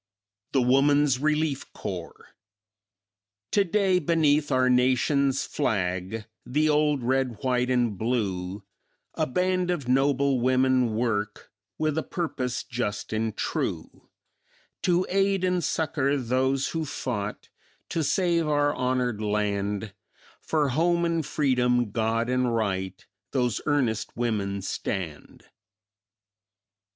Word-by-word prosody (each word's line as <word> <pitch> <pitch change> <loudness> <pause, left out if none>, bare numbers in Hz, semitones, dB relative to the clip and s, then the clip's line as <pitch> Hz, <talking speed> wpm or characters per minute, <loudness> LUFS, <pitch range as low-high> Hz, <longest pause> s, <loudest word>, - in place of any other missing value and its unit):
THE 135 -3 +3
WOMANS 135 +1 +3
RELIEF 150 -1 -1
CORPS - - -7 1.2
"Today 195 -1 +2
beneath 155 -2 +2
our 130 0 +3
Nation's 130 +2 +2
flag, 95 -3 -2 0.2
The 150 +5 +1
old 150 -3 +2
red, 130 -2 0
white 125 -1 +1
and 120 -4 +1
blue, 100 -5 -2 0.5
A - - -1
band 180 +5 0
of 150 -8 -2
noble 135 +1 +2
women 130 -2 +2
work 105 -3 -2 0.3
With 155 0 0
a - - -1
purpose 130 -9 -3
just 115 -5 -4
and 110 -1 -2
true; - - -3 0.7
To 180 +1 +2
aid 195 0 +1
and 180 -1 +1
succor 145 -3 0
those 130 +2 0
who 165 -1 -2
fought 110 -7 -4 0.4
To 165 - -1
save 170 0 +1
our 145 -1 +2
honored 125 -4 -1
land, 105 -1 -1 0.5
For 150 -3 +1
home 170 +5 +2
and 165 -1 0
freedom, 125 -6 +1
God 115 +1 0
and 125 -1 +1
right, 95 -4 -2 0.3
Those 125 -6 0
earnest 130 -10 0
women 100 -5 -1
stand." 90 -6 -5
130 Hz, 110 wpm, -26 LUFS, 115-150 Hz, 1.2 s, THE